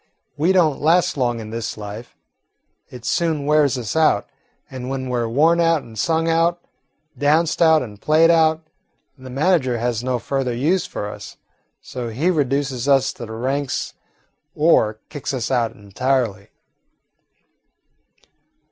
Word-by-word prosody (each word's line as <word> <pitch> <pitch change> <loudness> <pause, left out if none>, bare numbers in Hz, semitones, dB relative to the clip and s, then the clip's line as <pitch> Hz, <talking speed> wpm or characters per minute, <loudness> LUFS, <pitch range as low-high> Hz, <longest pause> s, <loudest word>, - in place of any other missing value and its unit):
We 160 +6 +2
don't 170 -6 +2
last 175 +4 +3
long 120 -4 0
in 110 -1 -8
this 115 -1 -4
life: 105 +3 -9 0.7
it 125 -2 -11
soon 160 -5 0
wears 150 -3 +3
us 120 0 -4
out, 155 -10 +2 0.4
and 130 -1 -7
when 135 -1 -3
we 125 - -1
're 115 -1 -1
worn 160 +8 +3
out 165 -3 +2
and 115 -1 -13
sung 165 +8 0
out, 165 +1 +2 0.6
danced 155 +4 +1
out 160 -3 +5
and 105 -4 -11
played 160 +2 +4
out, 160 -1 +2 0.5
the 130 -2 -12
manager 135 -2 +1
has 120 0 -2
no 130 -1 0
further 130 0 -2
use 165 +10 +1
for 105 - -5
us; 105 0 -9 0.5
so 125 -2 -6
he 145 +11 0
reduces 140 -4 -1
us 135 -2 +3
to 120 - -8
the 110 - -8
ranks 130 +4 -2 0.6
or 130 -9 +3
kicks 145 -1 -4
us 120 -1 -3
out 120 -3 +1
entirely." 105 0 -2
135 Hz, 150 wpm, -21 LUFS, 120-160 Hz, 0.7 s, out